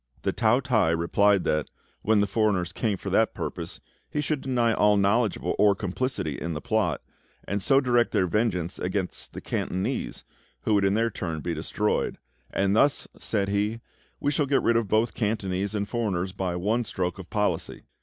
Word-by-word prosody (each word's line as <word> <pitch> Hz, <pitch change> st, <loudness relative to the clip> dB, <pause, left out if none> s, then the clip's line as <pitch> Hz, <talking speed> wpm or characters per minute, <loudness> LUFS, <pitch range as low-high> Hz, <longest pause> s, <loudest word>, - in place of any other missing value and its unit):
The -, -, 0 dB
Tao 115 Hz, +3 st, +3 dB
t'ai 110 Hz, -11 st, +2 dB
replied 100 Hz, +4 st, +3 dB
that, 75 Hz, -1 st, 0 dB, 0.3 s
when 110 Hz, -1 st, +3 dB
the -, -, +3 dB
foreigners 100 Hz, -4 st, 0 dB
came 105 Hz, -4 st, -1 dB
for -, -, -5 dB
that -, -, +2 dB
purpose, -, -, -5 dB, 0.3 s
he 150 Hz, -, -2 dB
should 150 Hz, -1 st, -1 dB
deny 120 Hz, -3 st, +1 dB
all 105 Hz, -1 st, +4 dB
knowledge 100 Hz, +2 st, +2 dB
of -, -, -13 dB
or 105 Hz, -1 st, +3 dB
complicity 95 Hz, -, -2 dB
in 85 Hz, -, -2 dB
the 75 Hz, -, -3 dB
plot, -, -, 0 dB, 0.4 s
and 100 Hz, +1 st, -1 dB
so 135 Hz, +6 st, +4 dB
direct 120 Hz, -3 st, +2 dB
their 95 Hz, -, +2 dB
vengeance 90 Hz, -3 st, -1 dB
against 95 Hz, 0 st, -3 dB
the -, -, -7 dB
Cantonese, 95 Hz, +1 st, -3 dB, 0.4 s
who 110 Hz, -, +1 dB
would 100 Hz, -1 st, +3 dB
in 95 Hz, +1 st, +2 dB
their 115 Hz, +1 st, +1 dB
turn 80 Hz, -5 st, -4 dB
be 85 Hz, -, -2 dB
destroyed; 95 Hz, +6 st, -1 dB, 0.3 s
"and 100 Hz, +1 st, +1 dB
thus," 140 Hz, +5 st, +3 dB
said 100 Hz, -3 st, -1 dB
he, 105 Hz, +3 st, 0 dB, 0.4 s
"we 145 Hz, -, +1 dB
shall 145 Hz, -1 st, +1 dB
get 140 Hz, -, +2 dB
rid 115 Hz, -, +3 dB
of 115 Hz, -2 st, +2 dB
both 110 Hz, +3 st, +2 dB
Cantonese 100 Hz, -2 st, -1 dB
and 100 Hz, -1 st, -1 dB
foreigners 95 Hz, -6 st, -1 dB
by 95 Hz, -2 st, -2 dB
one 105 Hz, +7 st, 0 dB
stroke 95 Hz, -3 st, -3 dB
of 90 Hz, -, -9 dB
policy." 105 Hz, -1 st, -1 dB
105 Hz, 185 wpm, -26 LUFS, 95-115 Hz, 0.4 s, all